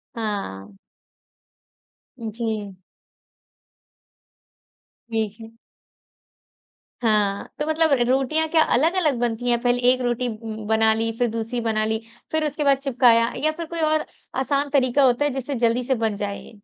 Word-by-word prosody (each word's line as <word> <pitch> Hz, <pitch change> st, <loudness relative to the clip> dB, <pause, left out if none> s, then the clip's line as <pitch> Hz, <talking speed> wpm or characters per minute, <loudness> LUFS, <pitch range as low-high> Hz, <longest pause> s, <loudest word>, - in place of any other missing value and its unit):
हाँ। 100 Hz, -, -5 dB, 1.4 s
जी। 220 Hz, -3 st, -4 dB, 2.3 s
ठीक 220 Hz, -2 st, -2 dB
है। 225 Hz, 0 st, -10 dB, 1.5 s
हाँ, 210 Hz, -3 st, +1 dB
तो 300 Hz, -, 0 dB
मतलब 315 Hz, -1 st, +2 dB, 0.2 s
रोटियाँ 270 Hz, +5 st, +1 dB
क्या 320 Hz, -1 st, +4 dB
अलग-अलग 310 Hz, 0 st, +2 dB
बनती 240 Hz, 0 st, -1 dB
हैं, 240 Hz, -1 st, +2 dB
पहले 245 Hz, 0 st, +2 dB
1 255 Hz, 0 st, 0 dB
रोटी 245 Hz, 0 st, 0 dB
ब 220 Hz, -1 st, -7 dB
बना 220 Hz, 0 st, +4 dB
ली, 225 Hz, +1 st, -1 dB
फिर 245 Hz, -, +3 dB
दूसरी 230 Hz, +2 st, -3 dB
बना 215 Hz, -1 st, 0 dB
ली, 220 Hz, +1 st, -1 dB, 0.3 s
फिर 315 Hz, -1 st, +1 dB
उसके 300 Hz, 0 st, -2 dB
बाद 275 Hz, -1 st, +4 dB
चिपकाया 240 Hz, -4 st, +3 dB
या 310 Hz, +4 st, +1 dB
फिर 335 Hz, -, -4 dB
कोई 335 Hz, +1 st, -6 dB
और 310 Hz, 0 st, +2 dB, 0.3 s
आसान 280 Hz, +1 st, 0 dB
तरीका 270 Hz, 0 st, +3 dB
होता 255 Hz, +3 st, +3 dB
है 290 Hz, -, +1 dB
जिससे 270 Hz, +1 st, -3 dB
जल्दी 235 Hz, +2 st, +1 dB
से 260 Hz, +1 st, +1 dB
बन 215 Hz, -2 st, 0 dB
जाए 200 Hz, 0 st, -4 dB
ये? 215 Hz, -, -15 dB
240 Hz, 145 wpm, -23 LUFS, 220-280 Hz, 2.3 s, क्या